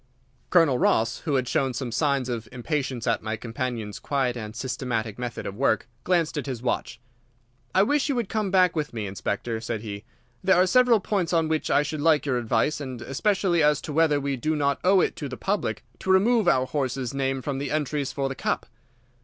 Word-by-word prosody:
Colonel 160 -8 +4
Ross, 115 +1 +2
who 150 -4 +1
had 130 -2 +1
shown 135 -1 0
some 125 -1 -3
signs 140 0 +1
of 115 -3 -4
impatience 130 -1 -3
at 115 -3 +1
my 110 0 -3
companion's 115 -2 -4
quiet 135 -4 0
and 110 -2 -6
systematic 120 -4 -3
method 120 -2 -4
of - - -4
work, 115 -1 +1 0.2
glanced 170 -4 +1
at 145 - -6
his 125 -3 -5
watch. 120 -1 -2 0.8
"I 190 - +6
wish 290 +6 +1
you 280 - +1
would 235 -4 -1
come 215 -1 -1
back 185 -2 +4
with 150 -6 -3
me, 110 -2 -3
Inspector," 105 +3 -3
said 115 -1 -3
he. 105 -2 -6 0.4
"There 190 0 +5
are 180 +1 +5
several 240 +2 +4
points 185 -4 -1
on 165 -1 +3
which 155 0 -1
I 145 - +4
should 150 0 -4
like 155 -1 +3
your 130 -3 +1
advice, 120 +6 0
and 130 -3 -6
especially 180 +4 +1
as 150 -1 +4
to 150 - -6
whether 155 -2 +3
we 140 -1 -2
do 155 +6 -1
not 140 -2 +1
owe 190 0 +5
it - - 0
to 145 - -4
the 130 - -6
public 200 +1 -2 0.2
to - - -6
remove 210 +2 +4
our 130 -6 +4
horse's 130 -2 -2
name 135 -1 -1
from 140 -2 -2
the 140 0 -3
entries 150 -2 -1
for 140 -1 -1
the 135 - -3
Cup." - - -2
140 Hz, 210 wpm, -25 LUFS, 120-165 Hz, 0.8 s, I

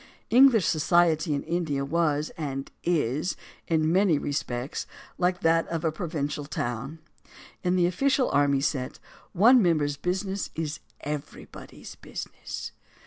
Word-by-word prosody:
English 240 - +6
society 160 0 +3
in 140 -1 -1
India 160 -4 -1
was, 155 -1 0
and 135 -3 -4
is, 155 -1 0 0.3
in 160 -1 +2
many 185 -3 +4
respects 135 -2 -3 0.3
like 180 0 +1
that 165 0 +3
of 165 -1 -3
a 160 - +2
provincial 150 -4 -3
town. 135 +1 -4 0.7
In 180 0 +2
the 180 -1 +3
official 260 +9 +1
and 140 - +3
army 140 -1 +2
set, 135 -3 -2 0.4
one 235 +7 +6
member's 150 -6 +1
business 190 +4 -2
is 155 -1 -3 0.2
everybody's 150 0 -7
busi - - -7
ness. - - -7
160 Hz, 135 wpm, -27 LUFS, 145-180 Hz, 0.7 s, English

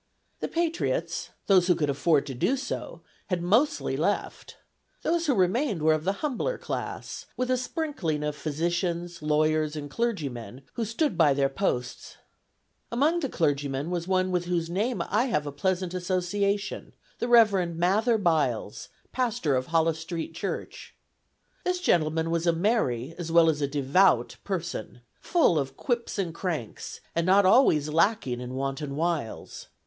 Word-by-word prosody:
The - - -2
patriots, 335 0 -1 0.2
those 185 -3 +4
who 180 - +4
could 150 -3 0
afford 145 +1 +2
to 140 - -5
do 235 - +1
so, 270 +1 -5 0.3
had 180 -3 -1
mostly 245 +11 +2
left. - - -2 0.5
Those 335 0 +1
who 275 - +3
remained 195 - +1
were 155 0 +5
of 155 +1 -2
the 195 - +3
humbler 300 - -1
class, - - -5
with 255 0 0
a - - +4
sprinkling 250 - -2
of 150 0 -2
physicians, 170 +3 -2
lawyers, 155 0 +1
and 145 -2 -6
clergymen, 135 - -3
who 230 - -2
stood 225 - -1
by 145 -4 +5
their 135 -1 +2
posts. 125 -6 -3 0.7
Among 295 +8 +2
the 280 -5 -2
clergymen 145 - -1
was 175 -1 -2
one 185 0 +1
with 180 -1 0
whose 170 -1 -1
name 220 +7 0
I 220 +5 +2
have 150 - 0
a 145 - -4
pleasant 185 +4 -1
association: 190 +3 -1 0.2
the 240 - -1
Reverend 200 -8 +4
Mather 210 +7 +3
Byles, 150 - 0 0.2
pastor 225 - 0
of 130 0 -1
Hollis 165 -1 +2
Street 165 0 -5
Church. 190 +4 -5 0.7
This 360 0 0
gentleman 160 - +1
was 170 +1 0
a 170 - +4
merry, 165 - 0
as 165 -1 -4
well 165 -1 +6
as 150 -1 -5
a 140 - +1
devout 140 0 +2
person; 170 - -4 0.2
full 320 - +3
of 135 -1 -4
quips 235 -4 -2
and 180 -5 -2
cranks, 165 - -5
and 170 - +1
not 195 +1 +5
always 185 - +5
lacking 160 - +1
in 125 +1 -6
wanton 135 +1 -3
wiles. 160 -6 -3
170 Hz, 155 wpm, -27 LUFS, 150-205 Hz, 0.7 s, well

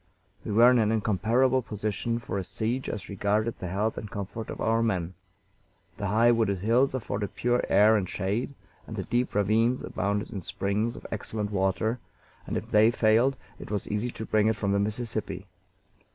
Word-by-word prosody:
We - - -4
were 120 +4 +7
in 125 - +4
an 110 -1 +2
incomparable 115 +5 +2
position 110 +1 -2
for 115 -4 -4
a - - -3
siege 110 +8 -2
as 105 - -5
regarded 105 +3 -1
the 90 - -4
health 105 +5 -1
and 105 - -8
comfort 100 +3 -6
of - - -6
our 115 +1 +2
men. 95 -6 -1 0.8
The 100 - -2
high 115 +4 +4
wooded 110 -4 +1
hills 120 +8 +2
afforded 100 -4 -3
pure 120 0 +1
air 110 +2 +6
and 95 -4 0
shade, 105 +9 -2 0.3
and - - -6
the - - -3
deep 120 -2 -1
ravines 110 +5 +2
abounded 100 +2 -2
in 100 - -5
springs 100 +6 -1
of - - -11
excellent 105 -1 -3
water, 100 +5 0 0.5
and - - -2
if - - -6
they 105 +1 +6
failed 120 +3 +3 0.2
it - - -9
was 105 -1 -2
easy 105 +4 -1
to 110 - -6
bring 110 0 +2
it 110 - +2
from 100 -2 -1
the 100 - +2
Mississippi. 105 -3 -3
110 Hz, 185 wpm, -27 LUFS, 100-115 Hz, 0.8 s, were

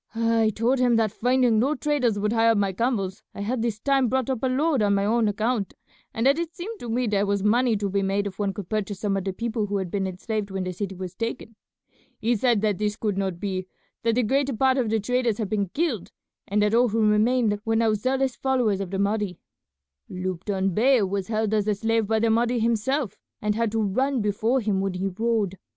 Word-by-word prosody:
I 230 -1 +2
told 245 +4 +1
him 245 -2 +3
that 220 -2 +2
finding 245 -1 +2
no 275 +6 +2
traders 265 -7 0
would 210 +2 0
hire 225 0 +4
my 200 -2 +1
camels 200 -3 -1
I - - -6
had 230 +4 -1
this 225 -2 -2
time 270 +1 +2
brought 260 +1 0
up 255 - -3
a 260 - +1
load 275 +1 +1
on 200 -1 +3
my 200 0 +1
own 225 +1 +2
account, 215 0 -1 0.4
and 230 - -2
that 280 +4 +4
it 340 0 -4
seemed 415 +5 -6
to 240 - -7
me 245 +2 0
there 205 -2 +1
was 200 -1 0
money 230 +2 +3
to 200 0 -2
be 200 +1 0
made 195 +1 0
if 195 0 -6
one 200 -1 0
could 195 -2 -7
purchase 205 -2 -3
some 205 -1 0
of 195 -1 -2
the 195 - -1
people 220 +1 -2
who 200 0 -1
had 190 -3 -4
been 195 -2 -1
enslaved 205 +3 -4
when 190 -1 -3
the 185 0 -4
city 195 +1 -4
was 185 -1 -6
taken. 230 +1 -5 0.6
He 235 +2 +1
said 235 -1 +2
that 210 -3 0
this 210 0 0
could 210 -2 -2
not 190 -3 -2
be, 185 -2 -3 0.3
that 230 -1 +1
the 250 - +2
greater 270 +4 +1
part 265 +3 +2
of 235 -4 0
the 220 0 +1
traders 245 0 0
had 215 -4 -3
been 200 -3 -1
killed, 235 - -2 0.4
and 210 +1 +1
that 210 +1 +1
all 240 +1 +4
who 220 0 +2
remained 215 0 +2
were 225 -1 0
now 225 -1 +3
zealous 260 +4 0
followers 250 -7 +1
of 195 - -4
the 195 - -3
Mahdi. 200 -2 -1 0.7
Lupton 185 +1 -2
Bey 245 +3 +4
was 195 -1 -2
held 220 -1 -1
as 210 -1 +1
a 210 - +2
slave 225 +1 0
by 220 +1 +1
the 225 +1 +2
Mahdi 240 +2 +2
himself, 235 +3 0 0.2
and 210 -1 0
had 230 0 0
to 225 - -1
run 255 +6 +1
before 220 +5 +1
him 205 -3 0
when 195 -1 -1
he 185 +2 -2
rode. 205 -2 -1
220 Hz, 235 wpm, -25 LUFS, 200-240 Hz, 0.7 s, hire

